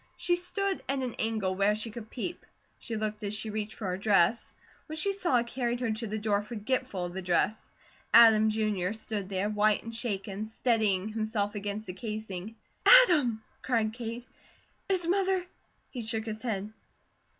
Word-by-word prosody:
She 350 0 +2
stood 385 +2 -1
at 275 - +1
an 255 -3 -2
angle 220 -4 0
where 200 +2 +2
she 220 +1 -2
could 220 0 -9
peep; 305 +8 -5 0.4
she 230 - -5
looked 215 0 -3
as 205 0 -2
she 215 0 -3
reached 215 0 -4
for 215 - -6
her 185 0 -2
dress. 205 +1 +3 0.4
What 310 0 -5
she 395 +6 +2
saw 345 -12 +2
carried 240 0 -2
her 240 -3 -1
to 220 +1 -2
the 215 +1 -3
door 205 -1 +1
forgetful 215 -2 -2
of 175 - -6
the 190 - -4
dress. 185 +4 0 0.4
Adam, 220 -2 +7
Jr., 215 -3 0
stood 215 -3 -5
there, 195 +1 -1
white 210 0 +2
and 230 - -7
shaken, 205 -3 -3
steadying 220 -4 +1
himself 215 -2 -2
against 205 +1 -4
the 180 - -6
casing. 215 0 -6 0.3
"Adam!" 300 - +6 0.2
cried 225 -4 0
Kate. 235 0 -6 0.6
"Is 370 -3 +1
Mother 380 0 +1 0.2
?" - - -42
He 250 - -5
shook 220 0 -1
his 220 -1 -5
head. 215 -3 -3
220 Hz, 175 wpm, -29 LUFS, 205-240 Hz, 0.6 s, Adam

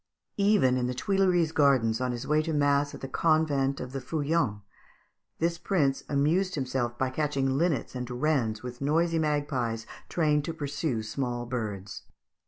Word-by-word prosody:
Even 200 -11 +4
in 125 -1 0
the 125 - -3
Tuileries 180 +1 +2
gardens, 130 -7 +3
on 125 -1 0
his 120 -1 -5
way 150 +1 +2
to 160 0 -3
mass 145 0 +2
at - - -11
the 135 - -4
convent 145 -2 +1
of 125 0 -6
the 135 0 -4
Feuillants, 140 -7 -1 0.7
this 170 +1 0
prince 150 -8 +1
amused 160 +7 +1
himself 125 -3 -2
by 130 0 0
catching 135 -2 0
linnets 155 -4 0
and 125 -1 -5
wrens 125 -4 0
with 125 0 -7
noisy 165 +3 +2
magpies 135 -7 -1 0.2
trained 150 -3 +2
to 165 - -4
pursue 145 -5 -2
small 120 +1 -3
birds. 105 -6 -4
140 Hz, 160 wpm, -28 LUFS, 125-155 Hz, 0.7 s, Even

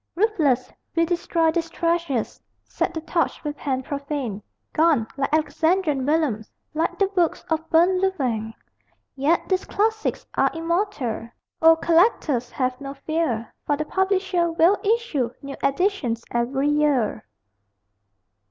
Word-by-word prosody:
Ruthless, 325 - +1 0.2
we 335 0 +3
destroy 335 -1 +1
these 330 0 -2
treasures, 335 -8 -1 0.2
Set - - -2
the 320 - -3
torch 330 +1 -1
with 295 -1 -3
hand 260 -3 -2
profane 280 -7 -4 0.3
Gone, 310 -8 +3
like 275 0 -1
Alexandrian 310 -2 +1
vellums, 290 -9 0 0.2
Like 320 +2 -1
the 395 - +3
books 365 -4 0
of 320 0 -1
burnt 360 +3 +4
Louvain! 245 - -1 0.6
Yet 290 +5 +1
these 375 -1 +1
classics 435 +1 -1
are - - +3
immortal: 330 - -2 0.3
O 325 0 +8
collectors, 325 - +2
have 255 0 -2
no 275 0 -6
fear, 275 -6 -2
For 290 - +2
the 305 - -2
publisher 380 -2 +1
will 335 +5 +4
issue 415 - +1
New 275 0 -6
editions 275 - 0
every 265 +4 0
year. 295 -7 +1
315 Hz, 130 wpm, -23 LUFS, 270-345 Hz, 0.6 s, O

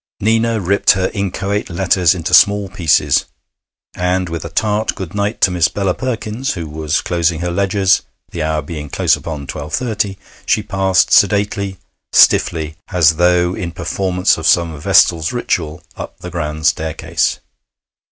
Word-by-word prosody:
Nina 115 +1 +1
ripped 100 +2 +3
her 95 -1 -1
inchoate 100 0 -2
letters 90 0 +2
into 80 -3 -4
small 100 -1 +5
pieces, 90 -6 +2 0.7
and, 90 0 -1
with 80 -1 -5
a - - -6
tart 105 0 -1
good 95 -4 -7
night 105 +2 -2
to 95 - +4
Miss 85 -2 +2
Bella 95 -1 -1
Perkins, 120 +1 -3
who 85 -3 -6
was 75 0 -2
closing 85 -1 -1
her 90 0 -2
ledgers, 95 +1 +2 0.3
the 85 - -5
hour 80 0 -1
being 75 -4 -7
close - - +2
upon 75 -3 -7
twelve 75 +2 -5
thirty, 105 -5 -2 0.3
she 105 - +1
passed 95 -3 +1
sedately, 100 -1 +2 0.4
stiffly, 80 -1 +3
as 80 -4 +3
though 90 0 +2
in 85 -2 -5
performance 90 0 0
of 80 - -1
some 85 -3 +2
vestal's 80 +1 +3
ritual, 85 -10 -3
up - - -8
the 90 - -9
grand 80 -2 -4
staircase. 80 0 0
90 Hz, 150 wpm, -16 LUFS, 80-100 Hz, 0.7 s, small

